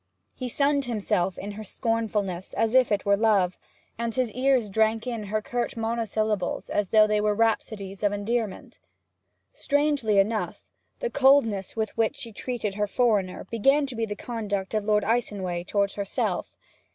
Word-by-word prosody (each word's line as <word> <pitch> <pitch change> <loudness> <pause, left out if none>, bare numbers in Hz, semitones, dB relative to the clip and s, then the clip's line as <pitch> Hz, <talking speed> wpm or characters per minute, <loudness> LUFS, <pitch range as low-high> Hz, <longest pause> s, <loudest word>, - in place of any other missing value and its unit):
He 255 - -5
sunned 280 +2 +1
himself 200 -6 -1
in 205 - -5
her 215 +1 -7
scornfulness 210 -5 -2
as 225 0 +1
if 255 -3 +4
it 205 - 0
were 200 0 +4
love, 200 -4 +2 0.4
and 235 -1 -2
his 255 -3 0
ears 255 -1 +2
drank 220 +1 +2
in 230 -4 -3
her 215 +2 -2
curt 240 +1 -3
monosyllables 220 -4 -1
as 205 -3 0
though 215 -1 +6
they 210 0 +1
were 210 0 +1
rhapsodies 210 -3 -1
of 205 -1 +2
endearment. 205 0 -3 0.7
Strangely 285 -7 +1
enough, 215 +3 0 0.4
the - - -1
coldness 260 -8 +3
with 220 -1 -2
which 225 +5 +1
she 235 -6 -7
treated 225 -2 -3
her 210 +1 -1
foreigner 205 -5 +1
began 270 +6 +3
to 265 -3 -6
be 225 -1 -1
the 205 - -4
conduct 205 -4 -4
of 215 -1 0
Lord 210 -1 +3
Icenway 195 -6 -1
towards 200 0 0
herself. 200 -1 -2
220 Hz, 165 wpm, -26 LUFS, 205-235 Hz, 0.7 s, though